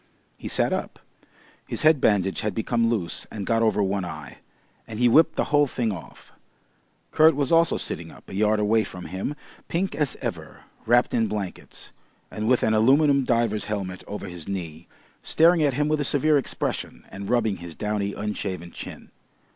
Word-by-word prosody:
He - - -8
sat - - 0
up. - - -4 0.7
His - - -4
head 155 -3 +5
bandage 95 -3 +2
had 105 -3 -2
become 115 +1 +1
loose 90 -8 -3
and 100 -3 -5
got 115 -1 +1
over 110 -2 +2
one 95 0 -1
eye, 75 -6 -8 0.5
and 110 - -7
he 125 +1 +4
whipped 155 +8 +5
the - - +1
whole 145 0 +5
thing 120 -3 -1
off. 90 -5 -10 0.8
Kurt 155 -1 +5
was 140 0 -1
also 165 0 +4
sitting - - -5
up, - - -16
a - - -10
yard 105 +2 +2
away 110 +1 +3
from 90 -3 -8
him, 95 +10 -4 0.3
pink 185 +3 -1
as 150 -4 -1
ever, - - -6 0.3
wrapped 120 +1 +3
in 115 -1 +2
blankets, 100 -4 -6 0.4
and 110 +1 -3
with 125 0 +3
an 110 - +2
aluminium 140 +5 +4
diver's 115 -3 +1
helmet 95 -4 -4
over 105 - -6
his 85 -3 -9
knee, 85 -4 -6 0.3
staring 165 +1 +4
at 145 -4 +2
him 150 +2 +1
with 155 -1 +1
a - - +1
severe 150 +2 +3
expression, 125 - -2
and 100 0 -7
rubbing 110 -5 +1
his 85 -2 -9
downy 105 -1 -2
unshaven 95 -4 -4
chin. - - -9
110 Hz, 180 wpm, -25 LUFS, 95-135 Hz, 0.8 s, head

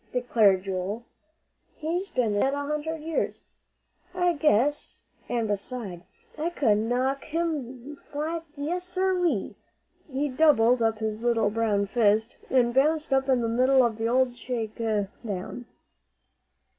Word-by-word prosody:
declared 220 -6 +3
Joel. 195 +4 -3 0.7
"He's 350 +5 -2
been 235 -5 0
dead 265 +7 +1
a 285 0 -3
hundred 300 +2 -3
years, 320 +1 -2 0.7
I 355 -1 +2
guess. 295 -2 +1 0.3
An' 235 -2 0
beside, 205 -3 -4 0.4
I 325 +3 0
could 230 -11 +2
knock 255 +5 0
him 295 -5 -3
flat, 320 +3 -3
yes, 335 +5 -2
sir 370 +1 0
ree!" 345 - 0 0.6
He 275 +3 0
doubled 255 -4 +4
up 225 -1 +2
his 220 0 -3
little 230 -3 +2
brown 210 -2 +1
fist, 215 +1 +2
and 240 -2 +3
bounced 300 +2 +2
up 270 0 +2
in 255 -2 +3
the 230 - 0
middle 255 +3 +4
of 225 -2 -2
the 225 - 0
old 250 +1 +2
shake 235 -3 -4
down. 215 0 -3
250 Hz, 135 wpm, -26 LUFS, 220-295 Hz, 0.7 s, doubled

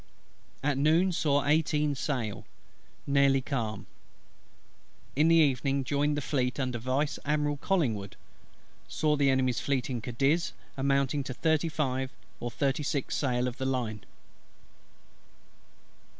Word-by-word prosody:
At 140 -1 +1
noon 165 +6 +4
saw 145 -4 +1
eighteen 150 0 +2
sail. 125 -6 -3 0.6
Nearly 140 -1 +4
calm. 115 -6 -3 1.3
In 150 +4 +4
the 165 - +5
evening 140 -3 +2
joined 145 +2 0
the - - -1
Fleet 125 -3 -1
under 125 -3 -1
Vice 135 +5 -1
Admiral 150 0 0
COLLINGWOOD. 120 - -1 0.7
Saw 150 -1 +1
the 140 -1 +3
Enemy's 130 -2 +2
Fleet 135 -2 -1
in 120 -2 -3
Cadiz, 135 +8 0 0.2
amounting 140 +1 +1
to 130 - -5
thirty 160 +1 +1
five 130 -4 -1 0.3
or 120 - -3
thirty 135 +4 0
six 140 -2 -2
sail 125 -3 0
of 125 +2 -6
the 130 - -2
line. 115 -6 -2
140 Hz, 125 wpm, -29 LUFS, 130-150 Hz, 1.3 s, the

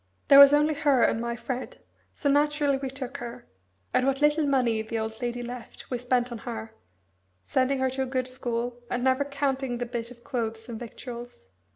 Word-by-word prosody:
There 280 - +10
was 280 0 +11
only 300 +1 +4
her 285 -4 +3
and 225 - +2
my 235 0 -2
Fred, 255 +1 -5 0.3
so 290 - -3
naturally 290 0 +3
we 270 0 -4
took 265 0 -6
her, 240 0 -8 0.5
and 255 - +3
what 270 0 +1
little 295 0 +3
money 245 -5 +2
the 220 +1 -4
old 220 +1 -4
lady 245 0 -2
left 245 +1 -9
we 250 - -1
spent 250 0 0
on 235 - -5
her, 225 -3 -6 0.7
sending 260 - +1
her 260 0 +1
to 265 +1 -2
a - - +1
good 255 -1 -1
school, 245 -1 -3
and 245 0 -1
never 260 +2 +3
counting 275 -3 -1
the 245 - -2
bit 235 -1 -4
of 240 -1 -15
clothes 225 -4 -3
and 230 -2 -6
victuals. 240 - -9
250 Hz, 200 wpm, -27 LUFS, 235-275 Hz, 0.7 s, was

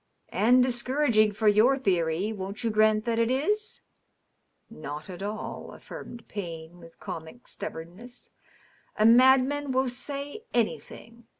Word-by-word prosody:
" - - -42
And 250 +4 +4
discouraging 245 -3 +2
for 215 +1 0
your 220 +6 +5
theory; 185 -3 0
won't 200 +2 -6
you 230 - 0
grant 215 0 +3
that 230 -1 0
it 230 0 +2
is?" 415 - -1 0.9
"Not 155 -3 -8
at 180 +1 -9
all," 210 +2 -6
affirmed 235 -1 -10
Payne, 170 -3 -7
with 165 -1 -16
comic 165 +10 -8
stubbornness. 195 +10 -9 0.7
"A 215 - +3
mad 255 +3 +7
man 290 0 -3
will 260 0 +1
say 280 - -6
anything. 230 0 -3
225 Hz, 135 wpm, -27 LUFS, 195-255 Hz, 0.9 s, mad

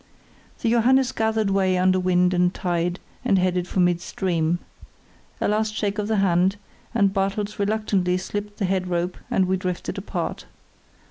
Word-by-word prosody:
The 230 - +2
Johannes 255 +2 +4
gathered 220 -3 0
way 190 -1 +2
under 185 +1 +3
wind 180 0 +2
and 180 0 +3
tide 175 -1 -1 0.2
and 215 -6 +3
headed 180 -1 +1
for 190 - -2
midstream. 175 -1 0 0.8
A - - +1
last 215 +1 0
shake 205 -1 -1
of 205 - -1
the 220 - +1
hand, 190 -1 +3 0.4
and 200 -4 +3
Bartels 200 +1 -1
reluctantly 200 -3 +1
slipped 205 +2 -5
the 200 - 0
head 185 0 0
rope 175 0 -1
and 190 - +2
we 190 +1 +1
drifted 180 -1 -3
apart. - - -4
190 Hz, 155 wpm, -23 LUFS, 180-210 Hz, 0.8 s, Johannes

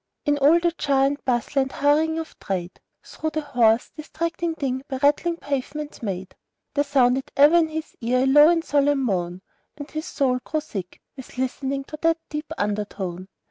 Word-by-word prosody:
In 290 -1 +2
all 300 +5 +6
the 345 0 +1
jar 275 -2 +3
and 285 +1 -2
bustle 255 +3 +1
and 265 0 -2
hurrying 310 +3 +2
of 325 -1 -7
trade, 185 -2 -4 0.2
Through 315 - -4
the 310 - -1
hoarse, 240 -5 +2
distracting 330 +2 -3
din 260 -3 -2
by 265 - -3
rattling 295 +5 +2
pavements 290 +1 -4
made, 190 -4 -4 0.4
There 285 - +2
sounded 265 -2 +2
ever 295 +4 +7
in 330 -2 +4
his 315 0 -6
ear 250 +2 +2
a - - +2
low 295 +3 +7
and 335 -1 +1
solemn 285 -1 +2
moan, 180 -4 -2 0.3
And 290 0 -8
his 310 +1 -4
soul 255 -3 0
grew 310 - -1
sick 195 -11 -7 0.2
with 265 -2 -11
listening 270 +2 -2
to 305 +2 -9
that 330 0 +3
deep 300 +1 -5
undertone. 200 -3 -3
280 Hz, 180 wpm, -23 LUFS, 245-305 Hz, 0.4 s, ever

